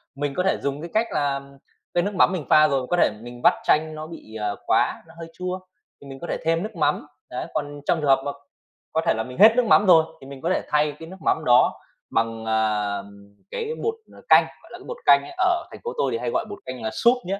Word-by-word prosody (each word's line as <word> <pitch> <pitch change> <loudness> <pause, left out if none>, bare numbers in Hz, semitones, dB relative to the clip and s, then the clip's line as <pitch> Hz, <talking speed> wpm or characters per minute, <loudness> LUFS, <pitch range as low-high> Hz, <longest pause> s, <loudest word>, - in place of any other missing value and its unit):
Mình 145 0 -2
có 180 - 0
thể 190 - +1
dùng 140 +1 -3
cái 170 - -7
cách 225 +2 +2
là 140 -1 0 0.5
cái 175 - +2
nước 205 +2 -2
mắm 185 - +5
mình 165 -6 -3
pha 155 0 +6
rồi, 135 -3 -1
có 175 - +1
thể - - +4
mình 120 0 -10
vắt - - +7
chanh 155 +1 +2
nó 155 0 -7
bị, 160 -9 -11
à, 105 -1 -2
qúa, - - +1
nó 165 - -16
hơi 165 0 -8
chua, 185 0 -4 0.4
thì 140 - -12
mình 135 0 -9
có 170 - -6
thể - - -2
thêm 165 +1 +1
nước 215 - -6
mắm, 150 -2 0 0.2
đấy, 125 - -5
còn 145 -1 -4
trong 170 - +1
trường 145 - 0
hợp 135 0 +5
mà 145 - -1 0.6
có 160 - +2
thể - - +3
là 110 - -1
mình 125 +1 -10
hết 220 +3 +8
nước 250 -1 +3
mắm 210 -1 +5
rồi, 165 -3 +6 0.2
thì 135 - -11
mình 135 -1 -10
có 170 - -1
thể - - +1
thay 150 0 +2
cái 160 - -9
nước 190 - -10
mắm - - +2
đó 125 +1 +4 0.3
bằng, 115 0 -1
à, 105 -2 0 0.5
cái 455 -2 -4
bột, 450 - +1 0.2
ờ, - - -15
canh, - - +7 0.2
gọi - - -18
là - - -8
cái - - -14
bột - - -6
canh - - +7
ấy, 360 - -10
ở 360 -2 +2
thành - - -10
phố 475 - -4
tôi 135 - +1
thì 115 - -1
hay 120 +1 -3
gọi - - 0
bột 205 - -8
canh 130 -1 -7
là 110 - -2
súp 235 - +3
nhé. 195 +2 -3
150 Hz, 275 wpm, -23 LUFS, 130-185 Hz, 0.6 s, hết